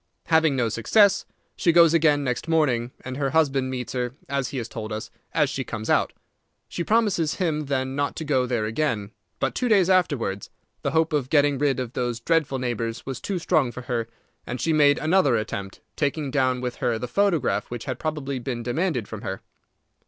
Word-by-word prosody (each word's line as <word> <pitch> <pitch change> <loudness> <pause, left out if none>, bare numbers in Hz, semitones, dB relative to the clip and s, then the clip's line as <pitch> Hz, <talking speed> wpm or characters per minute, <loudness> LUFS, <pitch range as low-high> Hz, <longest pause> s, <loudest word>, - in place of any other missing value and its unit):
Having 160 -3 +3
no 125 -3 +1
success, 195 - +3 0.3
she 170 - +3
goes 170 -1 +6
again 150 -3 +3
next 125 +3 -2
morning, 135 -8 +2 0.2
and 130 0 -5
her 140 -1 0
husband 135 -3 +2
meets 125 -2 -4
her, 125 0 -2
as 140 -2 -1
he 130 - -5
has 115 -3 -3
told 110 -1 -6
us, 110 +1 -5 0.2
as 150 -2 +2
she 135 -1 -3
comes 110 -3 -4
out. - - +2 0.6
She 170 - -4
promises 205 -7 +1
him 155 -5 -1
then 130 -1 -1
not 145 0 -1
to 160 - -4
go 130 -4 +1
there 120 -3 0
again, 110 -4 -1 0.3
but 135 - 0
two 250 - -1
days 190 -4 +4
afterwards 140 - +1 0.3
the - - 0
hope 160 0 +1
of 140 -4 0
getting 145 -2 +3
rid 140 -2 +1
of 125 -1 -4
those 120 -2 -2
dreadful 150 +1 +1
neighbours 115 -2 -3
was 135 -1 -5
too 195 - -2
strong 150 -6 +1
for 125 - -8
her, 120 -3 -2 0.4
and 125 +1 -5
she 165 - +1
made 145 -2 +5
another 155 -5 +3
attempt, 100 -3 -4
taking 145 -1 -1
down 130 -2 +1
with 125 -1 -4
her 120 -3 0
the 125 - -4
photograph 175 -2 +1
which 120 -1 -6
had 130 -3 -4
probably 145 -4 -3
been 120 -1 -4
demanded 125 - -1
from 110 -2 -7
her. 95 0 -5
135 Hz, 200 wpm, -24 LUFS, 120-155 Hz, 0.6 s, goes